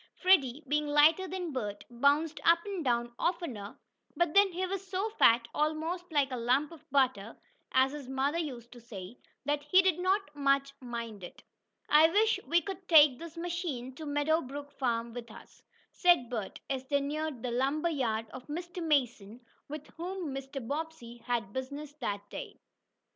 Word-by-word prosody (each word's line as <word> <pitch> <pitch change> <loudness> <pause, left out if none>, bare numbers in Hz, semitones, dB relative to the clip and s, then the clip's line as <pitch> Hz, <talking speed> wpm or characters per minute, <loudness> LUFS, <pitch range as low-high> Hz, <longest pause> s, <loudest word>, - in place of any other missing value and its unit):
Freddie, 310 -7 +3
being 300 +2 +1
lighter 305 +5 +5
than 360 -2 -4
Bert, 210 -6 -4
bounced 285 +6 +2
up 335 +1 +6
and 390 -5 -4
down 240 -2 0
oftener, 280 - -3 0.4
but 345 -2 +2
then 400 -1 +6
he 365 +2 -2
was 385 +1 -4
so 390 +4 -2
fat, 235 - +4
almost 320 +4 -1
"like 285 -3 +2
a - - -2
lump 255 +6 +1
of 330 - -15
butter," 250 -6 +1 0.3
as 260 +1 +4
his 285 -3 -8
mother 275 +5 0
used 245 -7 -5
to 245 - -12
say, 220 -1 -9 0.3
that 290 +1 0
he 295 +6 +4
did 370 -3 +2
not 375 -4 0
much 275 -1 +1
mind 235 -5 -6
it. 175 - -10 0.4
"I 310 +2 +6
wish 435 +5 +3
we 340 +4 +3
could 385 -1 -7
take 295 -6 +7
this 335 0 -9
machine 335 -8 -4
to 310 +3 -8
Meadow 290 +3 +1
Brook 285 +2 -8
Farm 235 -3 -2
with 235 -1 -7
us," 215 - -14 0.3
said 345 -10 +3
Bert, 215 -5 -4
as 265 -1 -3
they 285 0 +2
neared 290 -2 -3
the 250 - -2
lumber 275 +7 +1
yard 225 -7 -1
of 255 - -10
Mr. 345 +4 -5
Mason, 245 -8 0 0.3
with 300 0 -7
whom 350 -3 -4
Mr. 270 -2 -6
Bobbsey 290 -5 -5
had 230 -5 -1
business 280 +3 -5
that 205 -4 -3
day. - - -7
290 Hz, 175 wpm, -31 LUFS, 245-335 Hz, 0.4 s, take